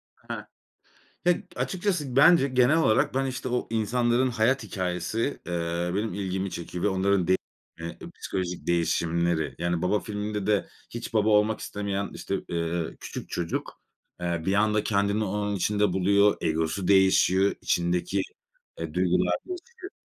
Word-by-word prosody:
Hah. - - -7 0.8
Ya, 175 - +6 0.2
açıkçası 175 -9 -1
bence 145 +1 +6
genel 130 +4 +4
olarak, 110 -9 +3
ben 135 +1 +1
işte 130 -1 -3
o 125 - -1
insanların 120 +3 +1
hayat 125 +3 +1
hikâyesi, 95 +7 -2
eee, 85 0 -1
benim 105 -2 -1
ilgimi 95 -1 -2
çekiyor 85 +1 -5
ve - - +4
onların 95 -1 +1
de 95 - +5 0.8
psikolojik 90 -2 -4
değişimleri, 85 -1 +1
yani, 85 0 -1
baba 100 +3 +2
filminde 105 -1 -4
de 105 -2 +2 0.2
hiç 120 -1 -7
baba 110 0 +3
olmak 105 +1 +3
istemeyen 100 -1 -3
işte, 100 - -3
eee, 85 -1 -2
küçük - - -7
çocuk, 85 -1 -4 0.4
eee, 85 -1 -1
bir 95 - +1
anda 105 +1 +2
kendini 100 +1 +1
onun 105 +1 -1
içinde 105 0 +1
buluyor, 100 +2 +4
egosu 80 +3 -1
değişiyor, 95 0 +4
içindeki, 90 +3 0 0.6
e, - - -5
duygular - - +2
değişiyor. 375 +2 -8
100 Hz, 140 wpm, -27 LUFS, 90-115 Hz, 0.8 s, Ya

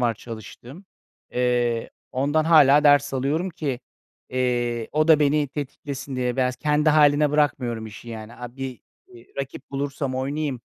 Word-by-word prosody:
var 120 -2 +1
çalıştığım. 120 - -10 0.5
Eee, 120 -2 0 0.2
ondan 145 +4 +1
hâlâ 150 -3 +6
ders 145 -2 +5
alıyorum 150 +8 -1
ki, 140 -7 -4 0.5
eee, 120 -2 -1
o 155 +1 +2
da 155 -2 +6
beni 145 0 +2
tetiklesin 140 -1 -6
diye 125 -1 -1
biraz. 125 -1 0
Kendi 150 +1 +1
hâline 150 -1 +4
bırakmıyorum 125 -6 0
işi, 110 +2 -11
yani. 110 0 -8
Aaa, 125 0 -9
bir, 135 -2 -6 0.3
iii, 120 0 -17
rakip 135 0 -6
bulursam 140 -1 -3
oynayayım. 135 0 -2
135 Hz, 145 wpm, -24 LUFS, 120-150 Hz, 0.5 s, hâlâ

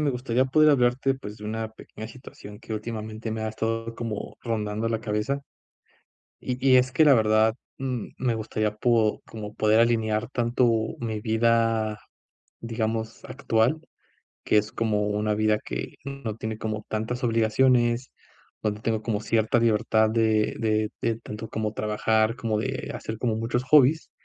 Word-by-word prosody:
Me 150 -2 +2
gustaría 125 0 0
poder 155 +3 +5
hablarte, 130 0 +2
pues, 105 -6 -9
de 105 - -11
una 110 +1 -3
pequeña 110 0 -10
situación 110 -4 -12
que - - -8
últimamente 110 0 -5
me 110 - -4
ha 110 - -1
estado 115 +1 -3
como 115 -3 -5
rondando 110 -1 -2
la 115 -1 -1
cabeza. 110 +5 -1 1.0
Y 125 -1 -3
y 130 -1 +7
es 125 +1 +2
que, 150 +4 +4
la 140 - +8
verdad, 110 -1 +4 0.3
mm, 130 -4 -3
me 120 -2 0
gustaría 110 -1 -2
po 110 -1 +2
como 105 -1 -8
poder 110 +1 +3
alinear 110 -1 +1
tanto 120 0 +2 0.3
mi 110 -2 -3
vida, 110 -1 +1 0.6
digamos, 110 -1 -3
actual, 130 +2 +1 0.6
que - - +2
es 105 0 -1
como 105 -2 0
una 105 0 0
vida 110 0 +2
que - - -5
no 140 -6 -5
tiene 110 -1 -5
como 110 -1 -4
tantas 115 +4 -3
obligaciones, 120 +2 +2 0.5
donde 105 -1 -1
tengo 110 -1 0
como 110 -3 -1
cierta 110 +2 +2
libertad 110 -1 +3
de 110 -1 +2
de 110 -1 +1
de, 115 -1 0
tanto 110 0 -7
como 110 -2 -2
trabajar, 110 +1 +1
como 115 -4 -1
de 130 +5 -3
hacer 110 - -5
como 115 -2 0
muchos 115 +2 -1
hobbies. 150 +3 +4
110 Hz, 160 wpm, -26 LUFS, 110-120 Hz, 1.0 s, la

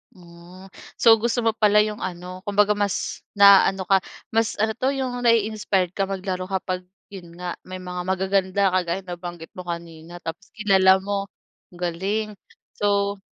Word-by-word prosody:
Hmm, 180 +1 -15 0.2
so 230 - +5
gusto 235 +1 0
mo 225 - +3
pala 210 -1 +4
yung 210 0 -4
ano 180 0 -6
kumbaga 205 0 +3
mas 205 -2 -1 0.2
naaano 195 -1 +6
ka, 195 +1 +3 0.3
mas 225 0 +1
ano 220 +1 +1
'to 255 +4 -2
yung 255 -2 -3
nai-inspired 215 -6 +1
ka 195 0 -1
maglaro 185 -1 -4
kapag 185 -1 -3 0.2
yun 175 -4 -11
nga, 180 0 -6
may 185 0 -7
mga 180 0 -5
magaganda 190 +1 +1
kagaya 185 0 -1
ng 180 - -9
nabanggit 175 -1 -8
mo 180 -1 -10
kanina 170 0 -7
tapos 170 +4 -7
kilala 190 -2 +4
mo? 200 0 -2 0.5
Galing 190 +5 -2 0.5
so 200 -1 +1
190 Hz, 155 wpm, -23 LUFS, 180-205 Hz, 0.5 s, naaano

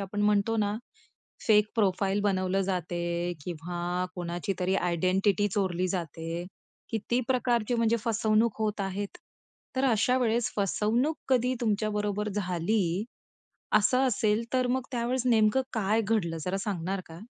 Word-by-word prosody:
आपण 200 +1 -3
म्हणतो 210 +2 +2
ना 205 -1 +1 0.7
फेक 210 -1 +5
प्रोफाइल 200 -1 +1
बनवलं 190 -1 +1
जाते 175 -1 -2
किंवा 175 +1 -3
कोणाची 175 +1 -3
तरी 185 +1 +1
आयडेंटिटी 185 +3 +2
चोरली 185 -2 0
जाते. 165 -1 -4 0.5
किती 230 +3 0
प्रकारचे 245 -2 +1
म्हणजे 230 0 +2
फसवणूक 220 0 +2
होत 215 -1 -1
आहेत. 195 +1 -4 0.6
तर 265 - +2
अशा 240 +3 +3
वेळेस 235 -1 +1
फसवणूक 220 - +1
कधी 255 -1 +2
तुमच्या 215 -2 +1
बरोबर 210 0 -1
झाली, 185 0 0 0.7
असं 255 +5 +3
असेल 215 -1 +1
तर 255 -1 +2
मग 260 +1 0
त्यावेळेस 245 +1 0
नेमकं 225 +1 +4
काय 220 0 +1
घडलं? 195 -6 0
जरा 185 +1 -1
सांगणार 190 -1 -2
का? 165 +2 -10
205 Hz, 130 wpm, -28 LUFS, 185-225 Hz, 0.7 s, फेक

